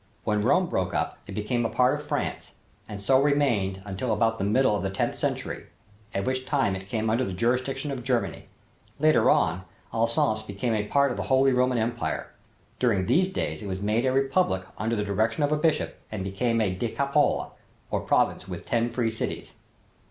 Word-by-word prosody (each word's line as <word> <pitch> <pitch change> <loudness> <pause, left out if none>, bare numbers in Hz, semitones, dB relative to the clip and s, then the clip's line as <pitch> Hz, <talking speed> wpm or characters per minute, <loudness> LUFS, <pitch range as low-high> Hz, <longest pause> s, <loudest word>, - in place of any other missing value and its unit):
When 105 -1 +1
Rome 130 - +3
broke 95 - -2
up - - -2
it 100 - -7
became 110 +3 -1
a 115 - 0
part 125 0 +3
of - - -11
France, - - -3 0.4
and 100 -2 -7
so 130 +5 +5
remained 115 -10 +1
until 100 +5 -3
about 115 +1 +1
the - - -1
middle 110 +3 +3
of - - -2
the 95 - -1
tenth 95 - -2
century, - - -3 0.4
at 100 -1 -2
which 130 0 -2
time 135 -10 +1
it 95 0 -7
came 110 0 -1
under 115 +4 +2
the 95 - -3
jurisdiction 130 +7 -1
of 130 -3 -5
Germany. 125 -2 -1 0.5
Later 145 -6 +4
on 95 - +2 0.3
Alsace 115 -1 +2
became 110 +3 -2
a 105 -1 -1
part 140 +1 +3
of - - -4
the - - -2
Holy 135 0 +4
Roman 125 0 +2
Empire. 115 +1 -2 0.5
During 105 -7 +2
these 185 - +2
days 190 - -3
it 105 - -6
was 95 0 -4
made 110 +3 +1
a - - +3
republic 135 - +1
under 110 +3 -1
the 105 - 0
direction 110 +6 0
of 145 - +1
a - - +4
bishop 150 0 0
and 105 -3 -3
became 115 +5 0
a 95 -4 +1
decapole, 140 +8 0 0.4
or - - +1
province - - +1
with - - -7
ten 120 0 +1
free 120 -2 0
cities. 110 - -4
115 Hz, 195 wpm, -26 LUFS, 105-130 Hz, 0.5 s, so